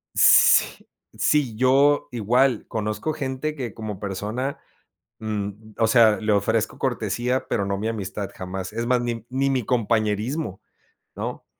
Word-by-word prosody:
S - - +7
sí - - -15 0.3
sí, 140 -7 +1
yo 135 +4 +3
igual 120 +2 +1
conozco 105 +7 -3
gente 145 0 -3
que 125 -7 -5
como 105 -3 -6
persona, 105 +7 -4 0.6
mm, 105 -2 -3 0.3
o 115 -1 +3
sea, 115 -2 +5
le 110 0 -1
ofrezco 100 -2 +1
cortesía 125 +2 -1
pero, 100 -4 0
no 100 0 -2
mi 110 +3 -3
amistad 100 -2 -4
jamás, 95 0 -6
es 115 +1 -2
más 125 0 +2
ni 115 -2 -4
ni 135 +2 0
mi 130 -2 0
compañerismo, 110 - -1 0.5
¿no?, - - -5
115 Hz, 145 wpm, -23 LUFS, 105-130 Hz, 0.6 s, S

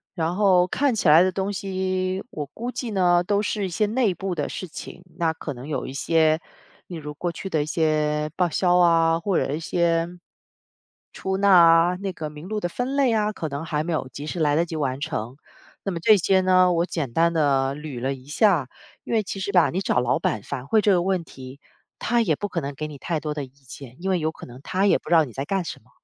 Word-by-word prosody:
然 165 0 -1
后 185 -3 +4
看 265 +6 0
起 205 - 0
来 155 +3 +8
的 185 0 +3
东 195 +2 -2
西 185 -1 -2
我 150 - -4
估 235 - -6
计 245 - -5
呢， 175 -4 +3
都 205 +3 0
是 205 -2 -1
一 - - -6
些 195 +5 0
内 215 -3 +1
部 190 -1 -3
的 150 -4 -3
事 185 - -6
情， 180 +2 -10 0.2
那 165 -1 +2
可 155 -2 -6
能 125 +3 -10
有 150 - -3
一 130 - -7
些 160 +2 +2 0.5
例 180 - -7
如 150 -2 -7
过 175 +4 -3
去 195 - -7
的 160 -5 0
一 145 - -2
些 155 -1 0
报 180 -2 +1
销 180 +2 +2
啊， 165 -1 +4
或 190 +1 0
者 140 - 0
一 155 - -2
些 165 0 0 1.0
出 190 0 -3
纳 200 0 +3
啊， 170 0 +6
那 195 0 -4
个 155 -4 -6
名 150 +3 -10
录 215 +1 -2
的 175 - -2
分 250 +9 -3
类 270 -4 +3
啊， 215 -1 +1
可 160 -7 -5
能 140 +3 -5
还 155 -2 -2
没 170 +1 -2
有 155 - -2
及 145 +4 -7
时 165 +3 -4
来 145 -2 +2
得 170 +2 +2
及 165 - -7
完 135 -3 -2
成， 120 0 -4 0.5
那 195 - -2
么 170 - -4
这 210 +5 +5
些 190 +1 +3
呢 185 -1 +4
我 170 +1 +1
简 140 -8 -4
单 170 +4 +3
地 140 -4 +1
捋 150 -5 -7
了 135 +2 -1
一 130 - -15
下， 160 - +2 0.4
因 - - -5
为 220 - +3
其 195 0 -6
实 195 +1 -3
吧， 180 -4 +4
你 180 - -2
找 195 - +1
老 125 0 +1
板 105 - -1
反馈 140 - 0
这 205 - +3
个 175 - +3
问 185 -2 0
题， 130 -3 -12 0.4
他 235 0 +1
也 165 -9 +1
不 205 - -4
可 170 - -2
能 140 0 -5
给 155 +2 -4
你 150 - -9
太 165 -2 -2
多 150 0 -4
的 150 -2 -4
意 130 - -18
见， 135 -1 -13
因 190 - -1
为 185 - +1
有 160 0 -1
可 - - -12
能 125 +1 -12
他 190 +6 0
也 - - +4
不 - - -12
知 170 - +4
道 160 - +6
你 125 - -12
在 135 +4 -4
干 195 +3 -1
什 - - -6
么。 120 - -28
170 Hz, 275 characters per minute, -24 LUFS, 150-190 Hz, 1.0 s, 来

